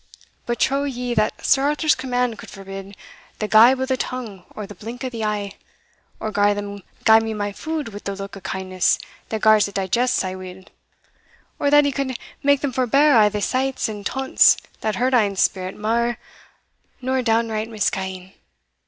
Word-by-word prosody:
But 240 -1 -2
trow 275 +1 +2
ye 250 -3 -3
that 215 -2 0
Sir 270 - +4
Arthur's 300 +2 +2
command 250 -3 -1
could - - -10
forbid 195 0 -9 0.4
the 215 - -2
gibe 235 +5 +6
o' 260 - 0
the 260 0 -1
tongue 225 -9 -5
or 210 - -5
the 205 - -10
blink 230 +6 -8
o' 260 - -2
the 230 - -6
ee, 205 -2 -2 0.6
or 215 - -3
gar 205 0 +3
them 205 0 -6 0.2
gie 220 0 +8
me 225 -1 -3
my 205 -1 -2
food 310 +4 -4
wi' 205 -1 -8
the 200 - -4
look 195 0 -7
o' - - -8
kindness 185 -1 0 0.3
that 220 -1 -3
gars 215 -1 +5
it 200 - -11
digest 235 +6 +1
sae 185 0 -1
weel, 185 0 -9 1.0
or 285 - +2
that 295 0 +6
he 285 - +1
could 265 -2 -3 0.2
make 285 -1 +3
them 285 - -1
forbear 275 +3 +4
a' 210 - +5
the 205 0 -3
slights 265 0 0
and 210 -2 -6
taunts 265 +5 +4 0.2
that 215 -1 -1
hurt 255 +2 0
ane's 205 -5 +2
spirit 185 -1 -1
mair 235 +2 0 0.8
nor 260 0 0
downright 225 -2 0
misca'ing? 190 -3 -3
220 Hz, 185 wpm, -22 LUFS, 200-255 Hz, 1.0 s, gie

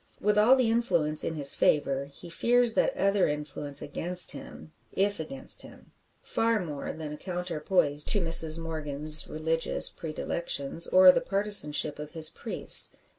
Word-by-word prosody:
With 210 +1 -1
all 215 +5 +4
the 250 -4 0
influence 170 -10 -2
in 160 - -5
his 140 -2 +3
favour, 140 -2 -1
he 140 +5 -15
fears 240 +6 +1
that - - -1
other 195 0 0
influence 150 -1 -6
against 175 +5 -1
him 155 - -12 0.2
if 200 0 -2
against 135 -4 -4
him, - - -17 0.3
far 230 -1 -1
more 150 -6 -7
than 155 -2 -9
a - - -9
counterpoise 175 -4 -1
to 205 - +5
Mrs 165 -2 +4
Morgan's 155 -2 +2
religious 160 +1 0
predilections, 160 -1 -2
or 185 0 +6
the - - -2
partisanship 195 -8 0
of 150 +1 -10
his 160 -2 +3
priest. - - +4
165 Hz, 150 wpm, -26 LUFS, 150-195 Hz, 0.3 s, or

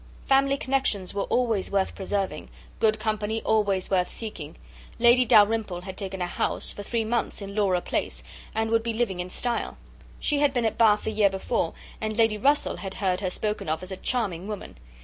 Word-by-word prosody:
"Family 275 0 +3
connexions 260 -9 0
were 200 - -1
always 230 -6 +1
worth 195 -1 0
preserving, 195 0 -3 0.3
good 220 -1 +3
company 215 0 -1
always 200 -4 +1
worth 180 -2 +2
seeking; 210 -10 -7 0.4
Lady 240 +2 +5
Dalrymple 210 -4 +4
had 190 0 -7
taken 190 -2 -4
a - - 0
house, 175 - -1
for - - -7
three 225 +3 -1
months, 235 +2 -1
in 200 -1 -7
Laura 195 -4 +2
Place, - - -2 0.3
and 220 0 0
would 230 0 +3
be 230 0 -2
living 220 -5 -1
in 180 +1 -4
style. 240 +5 -2 0.4
She 295 -2 +2
had 285 -2 +2
been 240 -2 +1
at 220 - 0
Bath 210 -2 +5
the - - -2
year 210 -2 +4
before, 190 -2 -2 0.3
and 215 0 -2
Lady 225 -2 +3
Russell 285 +6 +2
had 195 -1 -6
heard 185 -1 0
her 185 - 0
spoken 210 -2 -2
of 160 +3 -1
as 185 - -6
a - - -3
charming 195 -5 -1
woman. 210 - -6
210 Hz, 195 wpm, -26 LUFS, 190-230 Hz, 0.4 s, Lady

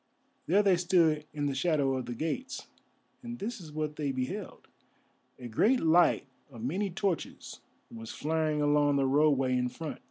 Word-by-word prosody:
There 200 +5 +4
they 190 -3 +4
stood 165 -4 +2
in 145 -1 -3
the 140 - 0
shadow 140 -2 +1
of 130 - -4
the 120 - -4
gates, 240 - -4 0.6
and 240 -1 -7
this 225 +1 -5
is 160 -3 -10
what 150 0 -3
they 145 -3 -1
beheld. 135 +11 -5 0.7
A 125 - -8
great 220 - +3
light 165 -1 +4 0.2
of 115 -5 -10
many 190 +11 -1
torches 190 -1 -3 0.3
was 115 -1 -9
flaring 155 -1 -1
along 145 -1 +3
the 140 -1 +2
roadway 135 -2 +3
in 125 0 0
front. 155 +3 -7
155 Hz, 165 wpm, -30 LUFS, 135-180 Hz, 0.7 s, There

